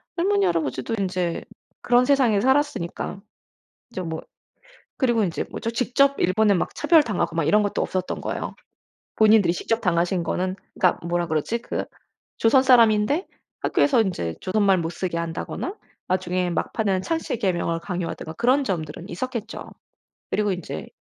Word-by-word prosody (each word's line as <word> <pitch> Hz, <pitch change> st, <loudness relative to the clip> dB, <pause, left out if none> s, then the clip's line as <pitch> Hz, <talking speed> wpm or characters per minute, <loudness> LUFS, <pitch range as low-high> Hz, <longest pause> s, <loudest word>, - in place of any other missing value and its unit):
할머니, 400 Hz, +3 st, +2 dB
할아버지도 160 Hz, -, -1 dB
인제 180 Hz, -3 st, -2 dB, 0.4 s
그런 245 Hz, +1 st, +4 dB
세상에 250 Hz, -7 st, +3 dB
살았으니까 265 Hz, -, 0 dB, 0.7 s
인제 190 Hz, -, -5 dB
뭐 160 Hz, -2 st, -5 dB, 0.8 s
그리고 240 Hz, -4 st, +2 dB
인제 170 Hz, -4 st, -2 dB
뭐죠? 230 Hz, -, -3 dB
직접 255 Hz, +4 st, +2 dB
일본에 205 Hz, +3 st, +3 dB
막 175 Hz, -, -1 dB
차별당하고 285 Hz, -, +2 dB
막 165 Hz, -, +1 dB
이런 210 Hz, +6 st, +4 dB
것도 205 Hz, -, -1 dB
없었던 185 Hz, -1 st, -2 dB
거예요. -, -, -4 dB, 0.6 s
본인들이 215 Hz, -5 st, +5 dB
직접 225 Hz, +6 st, -1 dB
당하신 175 Hz, -1 st, +1 dB
거는 185 Hz, +3 st, -2 dB, 0.2 s
그니까 180 Hz, -, +2 dB
뭐라 175 Hz, 0 st, 0 dB
그러지? 155 Hz, +9 st, -1 dB
그 235 Hz, -, -4 dB, 0.5 s
조선 245 Hz, +4 st, +5 dB
사람인데 235 Hz, -, +4 dB, 0.3 s
학교에서 260 Hz, -5 st, +3 dB
인제 170 Hz, -, -3 dB
조선말 195 Hz, -1 st, +2 dB
못 165 Hz, -1 st, -2 dB
쓰게 175 Hz, -1 st, -3 dB
한다거나 170 Hz, -, -4 dB, 0.3 s
나중에 180 Hz, -1 st, 0 dB
막판에 195 Hz, +2 st, -1 dB
창씨개명을 190 Hz, -, -1 dB
강요하든가 175 Hz, -3 st, -4 dB
그런 255 Hz, +6 st, +2 dB
점들은 170 Hz, -, -4 dB
있었겠죠. 230 Hz, +3 st, -5 dB, 0.6 s
그리고 210 Hz, -2 st, +1 dB
인제 175 Hz, -, -6 dB
200 Hz, 355 characters per minute, -24 LUFS, 175-240 Hz, 0.8 s, 본인들이